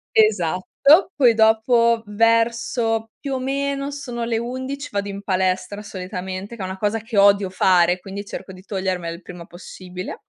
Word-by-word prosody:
Esatto. 215 - +3
Poi 250 -5 +5
dopo, 225 +1 +3
verso 230 +1 +1
più 280 -2 -4
o 260 - -1
meno 275 +1 -2
sono 245 -5 -5
le 230 -1 0
11, 260 +4 -5
vado 200 0 -2
in 200 0 -7
palestra, 190 +2 -1
solitamente, 190 +1 -6
che 220 - -9
è 190 - -2
una 190 +1 -5
cosa 210 +3 0
che 225 -1 -5
odio 200 -1 +5
fare, 180 -1 +3
quindi 195 +2 -7
cerco 195 - -8
di 185 - -12
togliermela 185 -4 -3
il 175 - -13
prima 175 -1 -10
possibile. 180 +1 -9
210 Hz, 165 wpm, -21 LUFS, 185-235 Hz, -, Poi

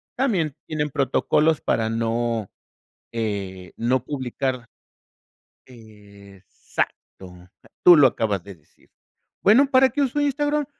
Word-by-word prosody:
también 185 - 0
tienen 150 -2 -3
protocolos 150 +3 +1
para 110 -1 -1
no, 115 -1 -2 0.6
eh, 100 -5 -4
no 120 +1 0
publicar. 130 -2 -4 1.0
Exacto, 100 -4 -9 0.3
tú 175 - +9
lo 145 - +7
acabas 105 -6 -2
de 100 - -10
decir. 75 -3 -30 0.5
Bueno, 255 +7 +5
¿para 260 0 +5
qué 290 - -2
uso 280 +2 0
Instagram? 290 +1 0
120 Hz, 105 wpm, -23 LUFS, 105-165 Hz, 1.0 s, tú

